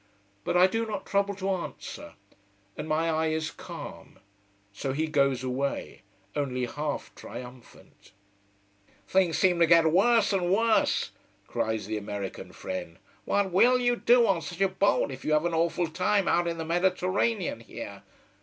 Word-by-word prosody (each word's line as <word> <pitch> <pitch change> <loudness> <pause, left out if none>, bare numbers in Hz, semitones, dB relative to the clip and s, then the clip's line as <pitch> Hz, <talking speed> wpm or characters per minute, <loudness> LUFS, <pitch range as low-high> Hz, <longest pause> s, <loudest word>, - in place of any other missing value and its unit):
But 175 - +1
I 180 - +7
do 225 +4 0
not 205 -3 -4
trouble 200 0 0
to 195 0 -2
answer, 185 -2 -6 0.6
and 150 - -6
my 160 +2 +1
eye 160 0 +1
is 160 0 -1
calm. - - -10 0.6
So 135 +6 -3
he 155 +3 0
goes 140 -4 +1
away, 130 +2 -3 0.3
only 130 -3 -1
half 145 +4 -4
triumphant. 125 -4 -12 1.0
"Things 185 -3 +2
seem 180 -2 +3
to 170 - +5
get 165 -1 +6
worse 205 +3 +4
and 180 -2 +1
worse!" 225 +3 +2 0.3
cries 110 -3 -2
the 110 +1 -3
American 100 -2 -6
friend. 95 -3 -6 0.3
"What 200 -2 +1
will 240 +8 +5
you 245 -1 +2
do 240 0 +4
on 190 -6 +2
such 155 +5 -7
a 195 - +4
boat 190 -5 +1
if 130 0 -8
you 155 - 0
have 150 +2 +3
an 170 - 0
awful 170 +2 +1
time 190 +4 +1
out 175 0 +2
in 170 0 -2
the 160 - -4
Mediterranean 185 - 0
here? 110 -3 -9
170 Hz, 160 wpm, -28 LUFS, 140-195 Hz, 1.0 s, I